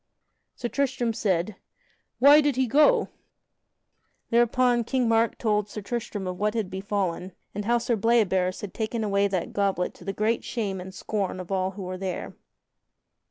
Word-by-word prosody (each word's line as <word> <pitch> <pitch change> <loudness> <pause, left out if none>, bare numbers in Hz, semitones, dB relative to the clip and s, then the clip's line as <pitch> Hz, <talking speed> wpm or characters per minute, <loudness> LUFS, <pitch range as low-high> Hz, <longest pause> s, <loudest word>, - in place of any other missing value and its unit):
Sir 240 - -3
Tristram 255 -3 0
said, 190 -2 -1 0.6
"Why 285 +4 +8
did 290 -3 +1
he 260 0 +2
go?" 300 - +4 1.2
Thereupon 240 +1 +3
King 250 +1 0
Mark 225 0 +2
told 210 -2 0
Sir 210 - -6
Tristram 215 -3 -4
of 180 0 -4
what 210 +2 0
had 215 -5 -2
befallen, 190 -2 -2 0.2
and 205 - -4
how 240 +2 +3
Sir 235 0 0
Bleoberis 200 -5 +2
had 205 -3 -7
taken 225 0 -2
away 200 -1 +2
that 190 -3 -3
goblet 195 -3 0
to - - -15
the 195 - -2
great 215 +4 0
shame 200 -6 -3
and 190 +1 -8
scorn 195 -1 -3
of 185 +1 -8
all 190 -1 +1
those 190 - -12
who 200 - -6
were 185 0 -5
there. 185 -2 -4
210 Hz, 170 wpm, -26 LUFS, 190-235 Hz, 1.2 s, Why